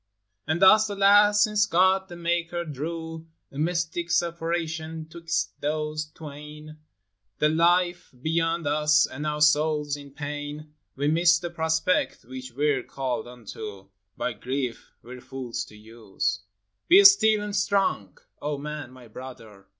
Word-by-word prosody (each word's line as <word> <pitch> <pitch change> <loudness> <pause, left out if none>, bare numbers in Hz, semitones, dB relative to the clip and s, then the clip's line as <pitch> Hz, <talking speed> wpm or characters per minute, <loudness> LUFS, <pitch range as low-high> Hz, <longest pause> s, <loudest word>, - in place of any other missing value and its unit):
And 160 +4 +1
thus, 215 +3 +7
alas! 205 +1 +5
since 210 0 +2
God 190 +1 +3
the 175 - -8
maker 170 0 -2
drew 160 +2 -6 0.2
A 140 - -8
mystic 170 +1 -1
separation 165 -1 -2
'twixt 165 -11 -3
those 155 +1 -2
twain, 150 0 -11 0.3
— 100 0 -53
The 150 - +3
life 175 +2 +2
beyond 165 +3 0
us, 150 +1 +3
and 145 +3 -6
our 150 0 -2
souls 150 -1 +3
in 145 -1 -11
pain,— 145 +1 -7 0.2
We 140 +2 -1
miss 170 +2 +4
the 175 0 -6
prospect 160 -1 0
which 130 +1 -8
we 145 +5 +1
're 135 -3 0
called 125 -3 -4
unto, 110 -5 -9 0.3
By 155 - -2
grief 130 -2 -4
we 125 +2 -10
're - - -13
fools 130 -3 -5
to 105 - -16
use. 105 -3 -4 0.5
Be 380 +4 +8
still 220 - +7
and 205 -1 -4
strong, 190 - 0 0.2
O 145 0 -2
man, 150 -2 -6
my 130 -2 -15
brother! 110 -5 -11
155 Hz, 145 wpm, -25 LUFS, 135-170 Hz, 0.5 s, Be